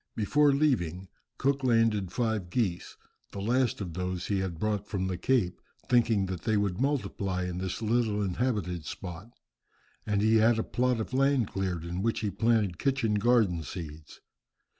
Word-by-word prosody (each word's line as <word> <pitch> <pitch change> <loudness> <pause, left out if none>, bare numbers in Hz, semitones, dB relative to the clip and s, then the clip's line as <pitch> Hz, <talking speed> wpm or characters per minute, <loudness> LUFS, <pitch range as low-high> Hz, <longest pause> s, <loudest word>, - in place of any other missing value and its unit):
Before 145 +7 +3
leaving 95 - 0 0.3
Cook 140 0 0
landed 115 -6 +2
five 110 -6 -1
geese, 95 -6 -2 0.4
the 100 - -5
last 120 +3 +1
of 90 -4 -5
those 90 0 -3
he 100 -2 0
had 95 -3 -3
brought 105 +2 -1
from 95 -2 -2
the 95 -1 -2
Cape, 95 -4 0 0.3
thinking 115 -5 +3
that 95 -3 -5
they 110 -1 +1
would 100 0 -1
multiply 100 -9 -1
in 90 0 -3
this 95 +4 -4
little 110 -1 +1
inhabited 95 -4 -1
spot, 90 +3 -7 0.8
and 105 -1 +1
he 110 +1 +5
had 110 +1 +4
a 110 - 0
plot 125 -1 0
of 110 - -4
land 135 -3 +2
cleared 90 -4 -3
in 90 +2 -3
which 115 +2 0
he 105 -2 -1
planted 105 -3 +1
kitchen 130 -6 +1
garden 105 -7 +3
seeds. 80 -2 -8
105 Hz, 165 wpm, -29 LUFS, 90-120 Hz, 0.8 s, he